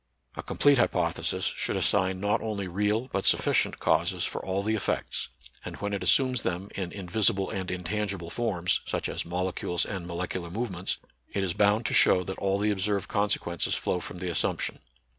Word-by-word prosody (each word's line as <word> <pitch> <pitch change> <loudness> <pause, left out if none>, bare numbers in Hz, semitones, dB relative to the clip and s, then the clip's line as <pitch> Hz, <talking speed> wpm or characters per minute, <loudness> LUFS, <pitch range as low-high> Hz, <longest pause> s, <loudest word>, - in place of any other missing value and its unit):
A - - -4
complete 145 -2 +3
hypothesis - - +1
should - - -1
assign 95 0 +2
not 100 +2 +1
only 105 -3 -3
real 105 +6 0
but 100 - -1
sufficient - - +3
causes 85 +3 +1
for - - -2
all 95 +1 -1
the 110 +2 +1
effects; 105 - -1 0.3
and - - -6
when 100 0 -3
it 100 - -2
assumes 125 +5 +3
them 95 +2 -3
in 90 -3 -3
invisible 95 0 0
and 95 -1 -3
intangi 100 +3 -2
ble 85 -1 -8
forms, 90 -7 0
such - - -1
as - - -3
molecules 90 0 -1
and 95 -4 -5
molecular 85 0 -4
movements, 95 -2 -2 0.4
it 100 - 0
is 90 -3 -1
bound 105 +3 +3
to - - 0
show 90 - +6
that 95 - -5
all 95 0 +1
the 105 +1 +1
ob 100 - -2
served 100 0 0
consequences 100 -4 0
flow 90 - -1
from 90 - -7
the 90 0 -3
assumption. - - -1
95 Hz, 185 wpm, -28 LUFS, 90-105 Hz, 0.4 s, show